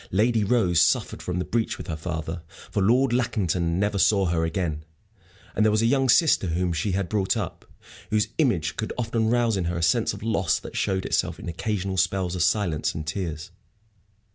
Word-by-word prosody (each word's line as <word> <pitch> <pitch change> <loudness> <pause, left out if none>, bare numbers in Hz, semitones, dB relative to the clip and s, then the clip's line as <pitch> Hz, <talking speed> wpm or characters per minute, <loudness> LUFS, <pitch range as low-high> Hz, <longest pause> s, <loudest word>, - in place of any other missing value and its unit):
Lady 110 +3 +2
Rose 95 -6 +3
suffered - - +1
from 90 -1 -3
the 90 - -1
breach 115 -1 -1
with - - -8
her 80 - -4
father, 80 +1 -5 0.3
for 100 - 0
Lord 120 +6 +3
Lackington 90 -9 0
never 100 0 0
saw 100 0 +3
her 85 -2 0
again. 80 -2 -2 0.7
And 105 - +2
there 110 - +5
was 110 +1 +2
a - - +3
young 135 +2 +2
sister 150 - +4
whom 85 +1 0
she 85 +5 -1
had 95 -1 -1
brought 100 -1 0
up, - - -5 0.4
whose 105 0 +1
image 105 - +1
could 110 - -3
often 115 -2 0
rouse 120 -3 +2
in 90 - -1
her 85 +1 -2
a 85 - -2
sense - - +2
of - - -8
loss 100 -7 +1
that - - -9
showed 95 -1 -1
itself 90 -2 0
in - - -8
occasional 95 +2 -3
spells 95 -1 0
of 90 - -2
silence 85 -5 +1
and 80 - -4
tears. 85 0 -4
95 Hz, 200 wpm, -25 LUFS, 85-110 Hz, 0.7 s, there